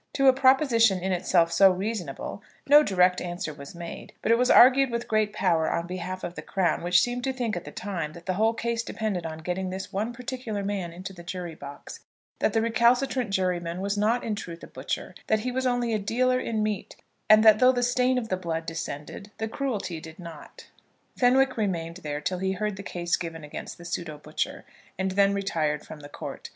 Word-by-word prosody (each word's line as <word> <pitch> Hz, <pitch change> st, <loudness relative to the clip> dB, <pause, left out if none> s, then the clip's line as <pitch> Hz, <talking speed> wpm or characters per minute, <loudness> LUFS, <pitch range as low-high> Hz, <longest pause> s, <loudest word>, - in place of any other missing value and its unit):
To 275 Hz, -1 st, +3 dB
a 260 Hz, -, +8 dB
proposition 260 Hz, -6 st, +4 dB
in 190 Hz, +2 st, -2 dB
itself 175 Hz, -2 st, +2 dB
so 190 Hz, +3 st, +7 dB
reasonable 190 Hz, -3 st, -4 dB, 0.2 s
no 295 Hz, +2 st, +8 dB
direct 180 Hz, -7 st, +3 dB
answer 175 Hz, -2 st, -4 dB
was 140 Hz, +2 st, -11 dB
made; 170 Hz, -1 st, -8 dB
but -, -, +2 dB
it 230 Hz, -, +6 dB
was 250 Hz, -, +3 dB
argued 265 Hz, +2 st, +7 dB
with 235 Hz, 0 st, -3 dB
great 215 Hz, -1 st, +1 dB
power 170 Hz, -6 st, +1 dB
on 170 Hz, -, -1 dB
behalf 185 Hz, +1 st, -5 dB
of 170 Hz, -, -4 dB
the -, -, -7 dB
crown, 190 Hz, -3 st, 0 dB
which 175 Hz, 0 st, +4 dB
seemed 245 Hz, 0 st, -1 dB
to 265 Hz, -, 0 dB
think 245 Hz, -4 st, -2 dB
at 175 Hz, -, -5 dB
the -, -, -8 dB
time 165 Hz, -7 st, -4 dB
that 170 Hz, +1 st, -12 dB
the 185 Hz, -, 0 dB
whole 220 Hz, +4 st, +2 dB
case 230 Hz, 0 st, -1 dB
depended 210 Hz, -7 st, -3 dB
on 160 Hz, 0 st, -6 dB
getting 185 Hz, +1 st, -2 dB
this 190 Hz, +2 st, -6 dB
one 210 Hz, +5 st, -1 dB
particular 240 Hz, -4 st, -5 dB
man 195 Hz, -4 st, -3 dB
into 185 Hz, +3 st, -8 dB
the 175 Hz, -, -11 dB
jury 175 Hz, -1 st, -6 dB
box, 140 Hz, -2 st, -10 dB, 0.4 s
that -, -, +1 dB
the 225 Hz, -1 st, +2 dB
recalcitrant 240 Hz, +1 st, +2 dB
juryman 180 Hz, -3 st, -1 dB
was 200 Hz, +1 st, -1 dB
not 220 Hz, +4 st, +1 dB
in 220 Hz, -, -2 dB
truth 170 Hz, -5 st, -7 dB
a -, -, -8 dB
butcher, -, -, -5 dB
that 220 Hz, -1 st, +2 dB
he 250 Hz, +3 st, -2 dB
was 260 Hz, +1 st, 0 dB
only 245 Hz, -2 st, 0 dB
a 215 Hz, -, +1 dB
dealer 255 Hz, +5 st, +1 dB
in 220 Hz, -3 st, -1 dB
meat, 210 Hz, -2 st, -3 dB, 0.3 s
and 215 Hz, 0 st, +8 dB
that 215 Hz, -1 st, +8 dB
though 255 Hz, 0 st, +7 dB
the 245 Hz, -1 st, -1 dB
stain 250 Hz, +1 st, +2 dB
of 230 Hz, -3 st, -3 dB
the 185 Hz, -, 0 dB
blood 165 Hz, -2 st, -3 dB
descended 165 Hz, +4 st, -6 dB
the 220 Hz, -, -2 dB
cruelty 210 Hz, -, -3 dB
did 160 Hz, 0 st, -11 dB
not. 170 Hz, -4 st, -11 dB, 0.5 s
Fenwick 255 Hz, +1 st, +3 dB
remained 170 Hz, -5 st, -2 dB
there 150 Hz, -4 st, -5 dB
till 180 Hz, +4 st, -2 dB
he 190 Hz, 0 st, 0 dB
heard 210 Hz, +1 st, -2 dB
the 195 Hz, -, -7 dB
case 175 Hz, -3 st, -1 dB
given 165 Hz, -2 st, -6 dB
against 150 Hz, -, -7 dB
the 175 Hz, -, -12 dB
pseudo 170 Hz, -3 st, -4 dB
butcher, 150 Hz, +1 st, -4 dB, 0.3 s
and 190 Hz, 0 st, -1 dB
then 200 Hz, +1 st, +4 dB
retired 160 Hz, -7 st, -1 dB
from 155 Hz, -, -10 dB
the 145 Hz, 0 st, -11 dB
court. -, -, -7 dB
195 Hz, 215 wpm, -26 LUFS, 175-230 Hz, 0.5 s, a